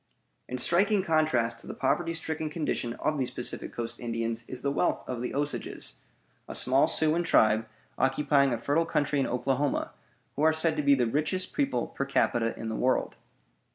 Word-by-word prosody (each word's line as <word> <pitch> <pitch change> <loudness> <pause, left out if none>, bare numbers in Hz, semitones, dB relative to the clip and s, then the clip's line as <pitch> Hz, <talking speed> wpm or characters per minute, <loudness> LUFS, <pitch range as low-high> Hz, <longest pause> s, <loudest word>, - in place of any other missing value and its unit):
In 125 - -3
striking 190 - +3
contrast 140 -9 +1
to - - -12
the - - -6
poverty 165 +5 0
stricken 160 -1 -3
condition 150 -6 -2
of 155 +4 -2
these 130 -1 0
Pacific 125 -1 -4
Coast 120 0 -5
Indians 115 -1 -3
is 130 -1 -7
the 140 - +1
wealth - - 0
of 125 -2 -4
the 125 - -4
Osages, 145 +1 -4 0.5
a - - -6
small 130 +2 +4
Siouan 160 +2 +2
tribe 110 -7 +3 0.3
occupying 140 0 +3
a 120 - 0
fertile 145 +8 0
country 145 -2 0
in 135 - +1
Oklahoma, 135 +3 -1 0.4
who 145 - -3
are 160 +1 +5
said 160 0 +1
to - - +1
be 140 -1 +5
the 125 -2 +1
richest 155 +9 -1
people, 280 -2 0
per 140 - -4
capita, 120 -4 +1
in 115 - -5
the 110 - -3
world. 130 +3 0
140 Hz, 185 wpm, -28 LUFS, 120-155 Hz, 0.5 s, are